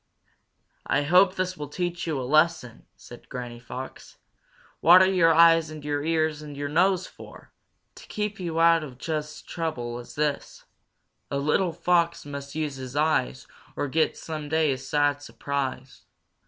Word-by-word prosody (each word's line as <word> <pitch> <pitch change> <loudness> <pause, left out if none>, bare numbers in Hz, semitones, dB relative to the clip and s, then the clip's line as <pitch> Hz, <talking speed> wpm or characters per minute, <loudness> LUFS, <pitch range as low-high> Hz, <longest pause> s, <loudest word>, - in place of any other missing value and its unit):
"I 145 - +1
hope 185 +5 +4
this 185 0 -2
will 150 -4 -6
teach 175 +3 -3
you 155 -4 -1
a - - -3
lesson!" 155 -3 +1
said 120 - -14
Granny 120 -1 -7
Fox. 125 +2 -9 0.6
"What 175 +2 +8
are - - +5
your 180 -3 +4
eyes 165 -1 +5
and 155 -1 -9
your 145 -1 -1
ears 155 -1 0
and 145 -2 -9
your 145 0 -3
nose 185 +4 +2
for? - - -14 0.4
To - - -14
keep 210 -1 -4
you 165 -3 -3
out 165 -1 +5
of 130 -5 -9
just 150 +1 -4
such - - -28
trouble 120 -8 -3
as 120 - -11
this. 150 -1 -3 0.6
"A 140 - -2
little 155 +6 +1
Fox 170 0 +1
must 140 0 -7
use 150 -3 -3
his 130 0 -8
eyes 150 - 0 0.3
Or 145 - -2
get 160 +4 0
someday 155 -1 -1
a 130 - -3
sad 145 +2 0
surprise. 135 -2 -5
150 Hz, 165 wpm, -26 LUFS, 140-165 Hz, 0.6 s, What